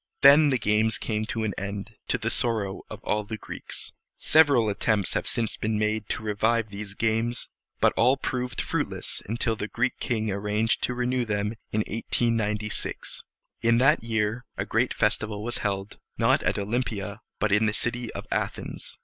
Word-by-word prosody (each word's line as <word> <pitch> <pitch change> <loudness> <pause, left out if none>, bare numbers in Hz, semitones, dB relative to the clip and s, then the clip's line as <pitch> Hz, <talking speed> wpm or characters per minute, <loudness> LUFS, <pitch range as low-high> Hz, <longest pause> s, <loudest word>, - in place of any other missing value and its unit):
Then 145 +2 +8
the 130 - +2
games 105 0 +2
came 110 -1 -2
to 115 0 -2
an 105 -2 -1
end, 100 +2 -5
to - - +1
the 115 0 -1
sorrow 110 -6 0
of - - -9
all 105 0 0
the 110 +2 -5
Greeks. - - -6 0.3
Several 145 -8 +5
attempts 105 -1 +1
have - - -1
since 115 -2 -1
been 110 0 -1
made 105 0 0
to - - -1
revive 110 +1 +1
these 100 0 -6
games; 115 +2 0 0.3
but - - +4
all 125 +4 +4
proved 125 -2 -2
fruitless - - -2
until 115 0 0
the 105 -1 -4
Greek 120 +3 -1
king 110 -4 -1
arranged 105 +3 0
to 125 - -3
renew 125 0 0
them 105 -2 -1 0.2
in 110 - +1
1896. 105 -1 -1 0.4
In 115 0 +4
that 135 +3 +4
year 110 +1 0
a - - -1
great 120 +3 +1
festival 105 -1 +1
was 120 +1 -2
held, 100 -1 -3 0.2
not - - +3
at - - 0
Olympia, 105 -1 -2 0.2
but 110 - 0
in 105 +2 +4
the - - +2
city 120 +2 -1
of - - -6
Athens. - - -3
110 Hz, 175 wpm, -26 LUFS, 105-120 Hz, 0.4 s, Then